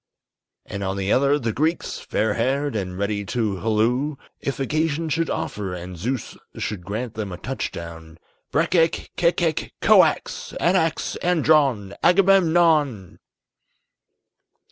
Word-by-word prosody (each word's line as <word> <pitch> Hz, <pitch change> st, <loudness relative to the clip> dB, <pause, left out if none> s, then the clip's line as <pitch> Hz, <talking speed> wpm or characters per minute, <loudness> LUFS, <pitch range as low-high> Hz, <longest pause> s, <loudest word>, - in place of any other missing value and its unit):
_" -, -, -64 dB, 0.7 s
And 100 Hz, 0 st, -3 dB
on 95 Hz, 0 st, -2 dB
the 100 Hz, +1 st, -1 dB
other, 140 Hz, +2 st, +3 dB
the 115 Hz, -6 st, -2 dB
Greeks, 155 Hz, +7 st, -1 dB
fair 110 Hz, -1 st, -1 dB
haired, 135 Hz, +4 st, 0 dB
and 90 Hz, -3 st, -3 dB
ready 100 Hz, +1 st, -1 dB
to 105 Hz, -2 st, -1 dB
halloo, 115 Hz, +8 st, +1 dB, 0.2 s
If 140 Hz, -, -4 dB
occasion 155 Hz, +3 st, -1 dB
should 165 Hz, +2 st, 0 dB
offer 95 Hz, -3 st, -3 dB
and 90 Hz, +1 st, -7 dB
Zeus 120 Hz, +8 st, -4 dB, 0.2 s
should 100 Hz, -5 st, -4 dB
grant 110 Hz, +5 st, -4 dB
them 105 Hz, -3 st, -5 dB
a 90 Hz, -, -6 dB
touch 130 Hz, +8 st, -4 dB
down, 80 Hz, -1 st, -9 dB, 0.3 s
"_Breck 165 Hz, +4 st, +1 dB
ek 165 Hz, -2 st, +2 dB
kek 170 Hz, 0 st, +2 dB
kek 165 Hz, -3 st, -1 dB
koax, -, -, +3 dB
Anax 170 Hz, -3 st, +1 dB
andron, 145 Hz, -, +2 dB
Agamemnon! 170 Hz, -, +3 dB
130 Hz, 135 wpm, -23 LUFS, 100-160 Hz, 0.7 s, other